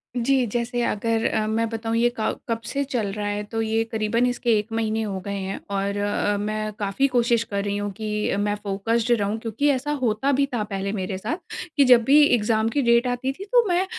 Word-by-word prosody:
जी, 255 +1 +2
जैसे 240 +2 -2
अगर 225 +1 0
अ, 215 - +1
मैं 225 +1 0
बताऊँ 225 0 -3
ये 240 +1 +3
क 215 - 0
कब 230 0 -1
से 280 0 -1
चल 245 -6 -2
रहा 210 0 -3
है, 205 0 -2
तो 225 +2 -3
ये 225 0 +1
करीबन 220 +2 +1
इसके 245 -1 -1
1 210 - -5
महीने 225 -1 0
हो 195 -3 -3
गए 200 - -3
हैं, 195 0 -4
और 200 0 -1
अ, 205 0 0
मैं 215 +1 -2
काफ़ी 205 +7 +1
कोशिश 240 -2 +2
कर 200 -3 -3
रही 200 0 -2
हूँ, 205 0 -3
कि 210 +1 -2
अ, - - 0
मैं 205 0 0
फोकस्ड 225 +4 0
रहूँ। 205 +2 -1
क्योंकि 230 +6 0
ऐसा 280 +1 0
होता 245 +3 +1
भी 280 +1 +3
था 230 -3 0
पहले 195 -1 -3
मेरे 190 -2 -3
साथ 225 - -3 0.4
कि 285 - +7
जब 245 -2 +6
भी 290 +5 +6
एग्ज़ाम 220 -3 +2
की 280 +5 0
डेट 235 0 +3
आती 250 +2 -1
थी, 375 - -9
तो 485 +3 +4
मैं 360 +1 +2
225 Hz, 225 wpm, -24 LUFS, 205-245 Hz, 0.4 s, कि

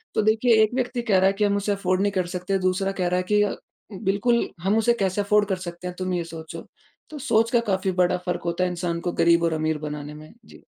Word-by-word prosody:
तो - - +3
देखिए 220 +1 +4
1 215 - 0
व्यक्ति 250 -1 -1
कह 215 -5 +2
रहा 190 - +4
है 195 - +2
कि 210 +1 -1
हम 200 0 +1
उसे 200 +1 -1
अफ़ॉर्ड 185 -1 0
नहीं 205 0 +1
कर 185 -2 0
सकते 180 +2 -1
दूसरा 195 +1 0
कह 180 - +1
रहा 180 +1 +1
है 180 - 0
कि 210 - +5
अ, 205 - -1 0.4
बिल्कुल 205 +5 +1
हम 195 +4 +1
उसे 235 +1 +3
कैसे 190 +2 0
अफ़ॉर्ड 205 0 +2
कर 190 - 0
सकते 175 +1 -7
हैं 180 - -6
तुम 185 0 -2
यह 175 -1 -1
सोचो? 160 -1 -9 0.4
तो 305 - -8
सोच 230 -3 +2
का 240 - +4
काफ़ी 190 0 0
बड़ा 180 0 +2
फ़र्क 180 -1 -2
होता 170 +1 0
है 180 - +1
इंसान 170 -1 -3
को 175 - -2
गरीब 170 0 +4
और 165 -1 +1
अमीर 155 0 -1
बनाने 150 0 -6
में 155 +1 -12
जी। - - -16
190 Hz, 260 wpm, -24 LUFS, 175-210 Hz, 0.4 s, कि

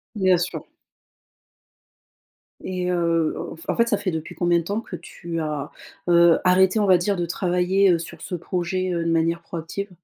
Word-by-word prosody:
Bien 185 -3 +3
sûr. 175 +1 -3 2.0
Et 180 -1 -2
heu, 165 -2 +1 0.3
en - - 0
en - - -4
fait, 235 0 +3
ça 210 - +2
fait 185 - -2
depuis 160 -1 -5
combien 175 -1 +2
de 165 - -3
temps 205 +5 -2
que 180 - -10
tu 170 -1 -6
as, 150 -2 -3 0.4
heu, 170 -1 +6
arrêté, 185 +3 +4
on 210 - +2
va 185 -2 +6
dire, 195 +3 0
de 175 - -1
travailler, 180 +2 +2
heu, 170 - +2
sur 165 - -9
ce 180 - -6
projet, 180 +2 -2
heu, 170 -1 -1
de 165 - 0
manière 165 +1 +1
proactive? 175 +4 -6
175 Hz, 185 wpm, -23 LUFS, 170-185 Hz, 2.0 s, heu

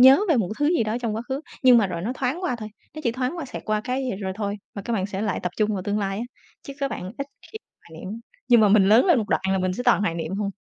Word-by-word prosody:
nhớ 265 +6 +9
về 320 - +4
một 210 -7 +1
thứ 290 - +2
gì - - +2
đó 215 +2 -1
trong 225 -3 -1
quá 225 - -3
khứ, 265 +2 -2 0.2
nhưng 250 -2 +8
mà 210 - +3
rồi 170 -2 -4
nó 230 +7 -1
thoáng 270 +8 -2
qua 290 -9 0
thôi, 215 -2 -7 0.3
nó 310 - -6
chỉ 235 - +2
thoáng 255 +6 -2
qua, 335 - -4
xẹt 260 - -7
qua 215 0 0
cái 255 0 -1
rồi 190 -1 -2
thôi, 205 -1 -2 0.2
mà 200 - -5
các 235 - -3
bạn 195 -3 0
sẽ 200 -1 -5
lại 215 -2 -1
tập 180 - -2
trung 215 0 +1
vào 195 -3 -2
tương 205 +2 -1
lai 195 0 -2
á, 235 - -3 0.4
chứ 275 - -8
các 275 -1 -1
bạn 185 +3 -5
ít 275 - -3 0.3
khi 440 - -6 0.3
hoài 160 -1 -11
niệm. 215 +5 -6 0.3
Nhưng 240 -2 +7
mà 210 - +6
mình 195 -1 +5
lớn 225 - +6
lên 340 -8 +5
một 210 - -2
đoạn - - +1
là 190 - +2
mình 185 0 0
sẽ 220 - -4
toàn - - +4
hoài 200 -5 0
niệm 165 +1 -4
thôi. 205 -1 -1
215 Hz, 320 wpm, -24 LUFS, 195-255 Hz, 0.4 s, nhớ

